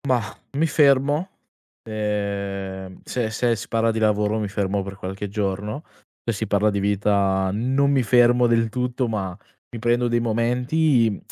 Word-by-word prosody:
Mah, 120 -5 0 0.2
mi 150 +4 +2
fermo, 145 +2 +3 0.6
ehm, 100 -3 -4
se 120 -3 -2
se 115 +1 +1
si 105 - -7
parla 115 0 +1
di 110 - -2
lavoro 105 0 +1
mi 105 -2 -2
fermo 100 0 -1
per 100 0 -7
qualche 95 +2 -5
giorno. 105 +6 -3 0.4
Se 115 - -2
si 110 +2 -3
parla 105 +1 +2
di 100 -1 0
vita 100 -1 +1
non 130 +7 +1
mi 135 -2 +3
fermo 120 +1 +4
del 115 -1 +2
tutto, 125 +2 -2
ma 95 -5 -3 0.4
mi 120 - -7
prendo 120 +2 +1
dei 120 0 +1
momenti, 120 +1 +1
110 Hz, 160 wpm, -23 LUFS, 100-125 Hz, 0.6 s, fermo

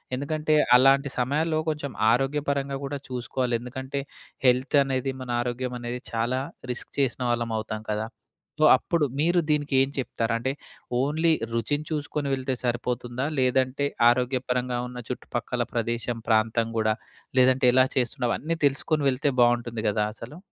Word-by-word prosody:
ఎందుకంటే 155 +3 -1 0.2
అలాంటి 135 +2 +5
సమయాల్లో 155 +5 +1
కొంచెం 145 -3 -3 0.2
ఆరోగ్యపరంగా 140 +1 0
గూడా 140 +1 -3
చూసుకోవాలి 125 0 -2
ఎందుకంటే 130 +3 -5 0.5
హెల్త్ 130 +3 +3
అనేది 135 0 -1
మన 125 - -7
ఆరోగ్యం 125 +1 -3
అనేది 120 +1 -4
చాలా 120 +3 0 0.3
రిస్క్ 125 - -4
చేసిన 130 -1 +1
వాళ్ళమవుతాం 110 -2 -2
కదా! 105 +1 -1 0.5
సో, - - +5
అప్పుడు 165 -3 0
మీరు 175 +3 +3
దీనికి 145 -2 +1
ఏం 135 +1 +3
చెప్తారు? 115 -3 -1
అంటే 130 +3 -1 0.5
ఓన్లీ 155 +5 +2 0.2
రుచిని 145 +6 -1
చూసుకొని 150 -1 -2
వెళ్తే 130 0 -1
సరిపోతుందా? 120 +1 -2
లేదంటే 130 +2 +1 0.2
ఆరోగ్యపరంగా 125 0 0
ఉన్న 125 0 -9
చుట్టుపక్కల 120 -1 -3
ప్రదేశం 115 0 -2
ప్రాంతం 110 +1 +2
గూడా 110 -1 +2 0.5
లేదంటే 130 0 +4
ఎలా 130 0 +6
చేస్తున్నావు 125 -2 0
అన్నీ 165 +2 -2
తెలుసుకొని 145 +2 +1
వెళితే 135 +2 0
బావుంటుంది 120 -2 +2
గదా! 105 +1 +1
అసలు. 135 +10 -10
130 Hz, 135 wpm, -26 LUFS, 120-140 Hz, 0.5 s, ఎలా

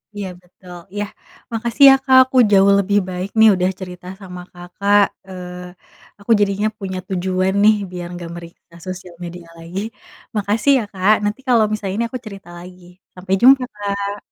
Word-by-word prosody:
Iya 205 -2 -5
betul 180 0 -14 0.2
iya, 205 0 -2 0.5
makasih 235 +4 0
ya 270 - +8
Kak 260 0 +5
aku 260 0 -3
jauh 195 0 +5
lebih 200 +1 +1
baik 180 +2 -4
nih 220 0 +8
udah 180 0 0
cerita 180 -1 -9 0.2
sama 180 -2 -9
Kakak, 200 +4 +1 0.3
eee, 180 -1 -12
aku 205 +3 -4
jadinya 205 +1 +1
punya 190 -2 -5
tujuan 185 0 -1
nih 215 +1 +6 0.2
biar 175 -1 -6
nggak 170 -1 -8
meriksa 170 0 -13
sosial 185 -1 -8
media 175 0 -9
lagi. 170 +3 -6 0.6
Makasih 210 +6 +1
ya 230 - -3
Kak 195 +2 +3
,nanti 210 +4 -2
kalau 235 -3 +5
misalnya 200 -2 -3
ini 235 - 0
aku 255 - -6
cerita 195 -4 -11
lagi 180 +1 -12 0.3
sampai 185 +1 -4
jumpa, 260 +1 +6
Kak. 200 0 -3
195 Hz, 170 wpm, -19 LUFS, 180-210 Hz, 0.6 s, ya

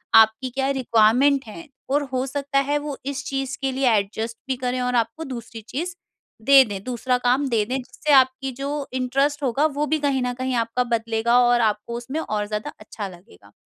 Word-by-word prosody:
आपकी 220 +3 +5
क्या 265 +2 -1
रिक्वायरमेंट 250 +4 +3
है, 330 +9 -10 0.2
और 285 +2 +2
हो 255 0 0
सकता 275 +1 -1
है 295 - +3
वो 290 -1 -5
इस 275 -1 -3
चीज़ 270 0 -3
के 270 -1 0
लिए 265 -1 +2
एडजस्ट 220 +3 -3
भी 260 - 0
करें 250 0 -1
और 250 0 0
आपको 230 +7 0
दूसरी 235 -4 -7
चीज़ 345 +5 -4 0.5
दे 275 -1 +8
दें, 200 -3 -6
दूसरा 250 0 -1
काम 250 +3 +1
दे 225 -3 +2
दें 250 +4 -3
जिससे 255 +3 -3
आपकी 260 0 +4
जो 275 +3 -5 0.2
इंटरेस्ट 275 +3 0
होगा 270 +4 +1
वो 295 +1 0
भी 310 - +2
कहीं 275 -3 0
न 250 0 -1
कहीं 255 -1 -1
आपका 230 +2 -1
बदलेगा 230 0 +1
और 240 -1 +4
आपको 215 +1 0
उसमें 265 +6 -4
और 210 -8 -2
ज़्यादा 210 0 -4
अच्छा 210 -1 -7
लगेगा। 180 +3 -16
255 Hz, 200 wpm, -23 LUFS, 230-275 Hz, 0.5 s, दे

